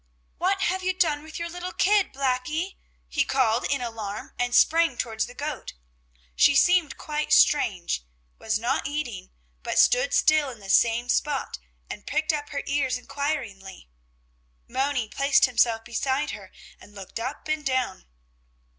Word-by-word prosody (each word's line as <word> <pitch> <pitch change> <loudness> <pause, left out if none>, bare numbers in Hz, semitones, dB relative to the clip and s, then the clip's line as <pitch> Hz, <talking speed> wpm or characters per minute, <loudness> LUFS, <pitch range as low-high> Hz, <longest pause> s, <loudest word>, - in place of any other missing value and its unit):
"What 390 +2 +1
have 375 +1 0
you 370 0 0
done 315 -5 +1
with 315 +1 -9
your 340 - -3
little 355 +1 -6
kid, 410 0 +2
Blackie?" 275 +7 -2 0.3
he 280 - +1
called 250 -4 +1
in 275 -2 0
alarm 220 -3 -6
and 245 0 0
sprang 330 -5 +4
towards 220 -2 -2
the 245 - -13
goat. 290 -2 -5 0.6
She 285 - +5
seemed 350 0 +3
quite 300 0 -3
strange, 180 - +3 0.4
was 220 -1 0
not 240 +5 -1
eating, 245 -11 -5 0.3
but - - -3
stood - - +4
still 310 -2 +4
in 245 - -9
the 195 -1 -4
same 235 +1 +3
spot 275 - -1 0.3
and - - -9
pricked 310 +2 0
up 290 -1 -4
her 280 - -4
ears 275 -3 0
inquiringly. 250 - -5 0.8
Moni 265 -3 -1
placed 275 +5 +3
himself 230 -3 +1
beside 260 +3 -1
her - - -10 0.3
and 205 - -17
looked 195 +3 -7
up 255 +7 -5
and 310 -1 -1
down. 260 -7 -1
275 Hz, 155 wpm, -25 LUFS, 235-310 Hz, 0.8 s, She